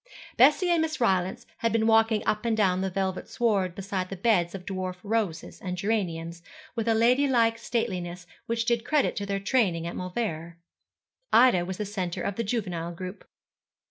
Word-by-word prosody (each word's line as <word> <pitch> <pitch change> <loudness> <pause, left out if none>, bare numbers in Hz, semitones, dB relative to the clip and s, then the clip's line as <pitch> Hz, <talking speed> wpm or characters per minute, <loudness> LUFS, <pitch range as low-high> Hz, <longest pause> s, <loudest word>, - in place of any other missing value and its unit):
Bessie 365 -3 +5
and 340 -2 +3
Miss 315 -2 -2
Rylance 195 +1 +1
had 230 - +1
been 225 -1 +2
walking 225 -1 +3
up 210 +1 0
and 230 -2 0
down 185 -3 +2
the 190 - -1
velvet 190 0 -3
sward 200 -7 0
beside 190 -2 -3
the 195 - -5
beds 190 -3 +1
of 180 -2 -8
dwarf 185 -2 -3
roses 210 -6 -2
and 180 -1 -4
geraniums, 170 -5 -2 0.3
with 230 0 -2
a 225 - +3
ladylike 235 -1 +3
stateliness 185 -7 -3 0.2
which 230 0 -1
did 235 -1 +1
credit 300 0 +1
to 200 - -3
their 200 0 -1
training 195 -6 +1
at 170 - -5
Mauleverer. 175 -4 -4 0.7
Ida 230 -8 +5
was 185 0 -5
the 210 - -3
centre 185 -4 -3
of 200 - -2
the 230 - -1
juvenile 180 -7 -3
group. 185 +3 -8
200 Hz, 175 wpm, -27 LUFS, 180-230 Hz, 0.7 s, Bessie